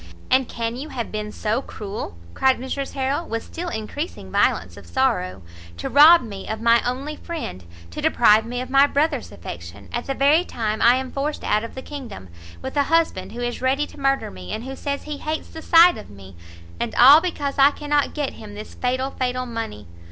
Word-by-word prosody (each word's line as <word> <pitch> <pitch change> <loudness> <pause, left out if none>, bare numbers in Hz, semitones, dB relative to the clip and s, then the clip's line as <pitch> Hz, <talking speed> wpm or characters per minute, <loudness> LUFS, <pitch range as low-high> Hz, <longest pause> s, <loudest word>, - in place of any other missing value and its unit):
"And 260 -1 +4
can 230 0 -3
you 290 +4 -6
have 240 -5 -5
been 210 0 -4
so 220 +4 -1
cruel?" 200 - -7 0.2
cried 265 -1 +3
Mrs 265 +2 -4
Harrel, 275 +5 -1
with 225 0 -3
still 345 +1 -6
encreasing 220 - -5
violence 85 -1 +1
of 100 -3 -13
sorrow, 90 +2 0 0.3
"to 85 - -4
rob 310 +3 +8
me 200 -4 -8
of 220 - -3
my 230 +1 +4
only 270 +5 -3
friend, 315 - -6 0.3
to - - -6
deprive 220 -2 +5
me 245 +2 -4
of 255 0 -7
my 275 +1 +6
Brother's 285 -3 0
affection, 85 +3 -9
at - - -3
the 270 - -2
very 290 +6 +4
time 220 -9 -3
I 240 +1 +6
am 260 0 -3
forced 290 +2 -3
out 215 - +1
of 230 - -8
the 260 - -7
kingdom, 240 - -8 0.3
with 265 - -5
a 285 -1 +3
husband 325 - +1
who 240 - -6
is 240 0 -3
ready 270 +3 +1
to 295 - -15
murder 275 0 0
me, 90 -1 -9
and 220 - -4
who 265 +1 -6
says 280 0 -4
he 300 -1 -5
hates 310 +1 -4
the 320 - -9
sight 340 +2 +6
of - - -12
me, 95 -2 -13 0.4
and - - -3
all 280 +6 +9
because 290 -6 -3
I 275 +1 +8
cannot 290 -1 -1
get 290 -3 -2
him 210 -2 -11
this 210 +1 -9
fatal, 255 +2 -1
fatal 255 -1 -2
money! 225 - -6
255 Hz, 210 wpm, -22 LUFS, 215-285 Hz, 0.4 s, all